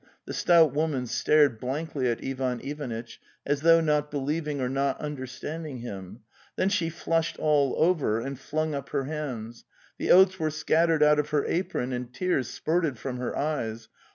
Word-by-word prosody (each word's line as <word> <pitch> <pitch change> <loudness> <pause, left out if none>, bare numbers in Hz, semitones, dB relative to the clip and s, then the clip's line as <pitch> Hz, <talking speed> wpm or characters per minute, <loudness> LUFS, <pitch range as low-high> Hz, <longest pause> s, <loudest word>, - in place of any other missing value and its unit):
'The - - -6
stout 165 -5 +4
woman 145 -4 0
stared 145 0 +3
blankly 135 0 -2
at 115 - -3
Ivan 130 -2 -2
Ivanitch, 125 -6 -6 0.2
as 145 0 0
though 165 +1 +6
not 150 -2 +1
believing 150 +1 -2
or 130 - 0
not 135 +1 0
understanding 150 +1 -6
him, 100 -2 -8 0.3
then 190 - +1
she 175 -5 0
flushed 165 0 -1
all 145 -3 +2
over, 155 -10 +2
and 135 +2 -5
flung 155 +2 -2
up 140 -2 -5
her 140 -2 -1
hands; 130 -6 -5 0.4
the - - -2
oats 185 0 +6
were 155 -1 +1
scattered 160 +1 +2
out 150 0 +5
of 150 0 -1
her 150 -2 +1
apron 130 -7 -1
and 125 0 -4
tears 140 -3 0
spurted 160 -5 -1
from 125 +2 -5
her 125 0 -3
eyes. 115 -7 -2
145 Hz, 170 wpm, -27 LUFS, 125-155 Hz, 0.4 s, though